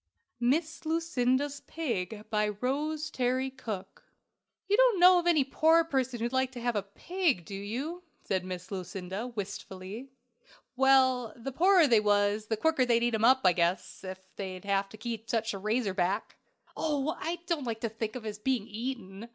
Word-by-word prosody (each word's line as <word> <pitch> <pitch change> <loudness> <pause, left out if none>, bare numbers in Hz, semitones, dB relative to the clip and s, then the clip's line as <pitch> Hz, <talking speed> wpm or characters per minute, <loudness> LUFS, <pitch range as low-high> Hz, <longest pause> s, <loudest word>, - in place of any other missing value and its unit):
MISS 310 +8 0
LUCINDA'S 285 -4 0
PIG. 220 - -3
BY 210 -1 +2
ROSE 295 +8 -2
TERRY 255 0 0
COOKE. 210 -7 -7 0.6
"You 405 - +3
don't - - +4
know 360 0 +8
of 350 - -2
any 320 -5 +5
poor 320 +5 +4
person 260 -6 -1
who'd 235 +2 -2
like 260 0 +1
to 245 - -6
have 240 -1 -1
a 205 - +1
pig, 265 - -1
do 200 - -9
you?" 250 - -4 0.2
said 190 -1 -1
Miss 185 0 -7
Lucinda, 190 +3 -5
wistfully. 205 +1 -7 0.7
"Well, 260 -3 +4
the 250 +3 -6
poorer 360 +4 +5
they 235 -6 +5
was, 205 0 +2
the 220 - -1
quicker 320 +1 +2
they'd 235 -1 +3
eat 240 0 +1
him 220 0 0
up, 260 +3 +6
I 180 - +6
guess 170 +2 -1
ef 185 0 -6 0.2
they 190 -2 -5 0.3
could 215 +2 -13
eat 225 -1 -4
such 225 -2 0
a 195 - -5
razor 215 0 0
back." 190 +3 -1 0.4
"Oh, 300 +1 -1
I 340 +1 -2
don't 330 -6 -1
like 225 -1 -3
to 230 - -1
think 220 +1 -4
of 250 - -6
his 210 -1 -5
being 245 -2 0
eaten! 225 -2 -6
240 Hz, 175 wpm, -30 LUFS, 205-280 Hz, 0.7 s, know